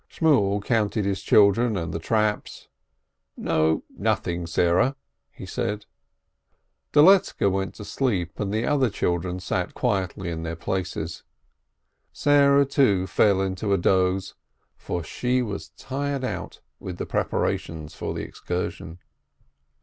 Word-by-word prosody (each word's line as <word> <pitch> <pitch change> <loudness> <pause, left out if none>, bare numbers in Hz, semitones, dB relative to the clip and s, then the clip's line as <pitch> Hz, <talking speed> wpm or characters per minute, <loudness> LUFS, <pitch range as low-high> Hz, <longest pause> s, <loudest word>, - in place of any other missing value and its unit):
Shimiel 105 -11 +2
counted 110 -3 0
his 100 -1 -1
children 105 +2 +4
and 85 -2 -3
the 80 - -2
traps. 105 +4 -1 0.7
"No, 80 0 +1
nothing, 85 -1 -1
Sarah 85 - +2 0.2
!" - - -54
he - - -6
said. 105 +1 -3 1.1
Doletzke 155 - +5
went 95 0 -2
to 105 - -9
sleep, 100 -10 -1
the 105 +3 -1
other 135 -4 +2
children 90 -2 -1
sat 90 0 -3
quietly 95 -6 -1
in 80 -1 -4
their 85 0 -4
places. 85 -2 -4 0.9
Sarah, 140 -1 +4
too, 115 -9 +2
fell 95 +1 +3
into 95 +2 -1
a - - +3
doze, 95 +1 +1 0.4
for 85 - -4
she 125 +9 0
was 100 -4 -5
tired 140 0 -3
out 130 - -5 0.2
with 90 -2 -7
the - - -3
preparations 80 -2 -2
for - - -4
the - - -3
excursion. 90 -1 -5
100 Hz, 125 wpm, -25 LUFS, 90-120 Hz, 1.1 s, Doletzke